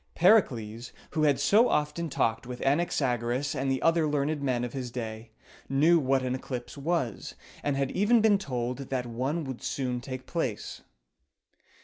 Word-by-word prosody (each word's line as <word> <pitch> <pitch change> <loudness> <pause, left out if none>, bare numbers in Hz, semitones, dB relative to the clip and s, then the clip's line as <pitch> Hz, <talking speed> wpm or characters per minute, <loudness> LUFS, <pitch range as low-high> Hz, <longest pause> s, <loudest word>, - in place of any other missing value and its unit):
Pericles, 120 - +2 0.2
who 155 -1 +1
had 145 -2 +3
so 225 +4 +4
often 150 +3 0
talked 115 -3 0
with 125 -1 -6
Anaxagoras 135 -4 0
and 135 +1 -1
the 130 - -1
other 165 -1 +3
learned 145 0 0
men 125 -3 0
of 120 - -4
his 130 -3 -4
day, 115 -2 -6 0.4
knew 155 +6 +4
what 135 -2 +1
an 130 0 -1
eclipse 125 -1 -5
was, 140 - -2 0.3
and 145 -2 -1
had 135 -1 0
even 210 +5 +3
been 210 -2 +4
told 125 -7 -3
that 130 -2 -1
one 130 +8 -2
would 130 -3 -6
soon 125 -3 -2
take 130 0 -7
place. 135 -11 -3
135 Hz, 160 wpm, -28 LUFS, 125-155 Hz, 0.4 s, so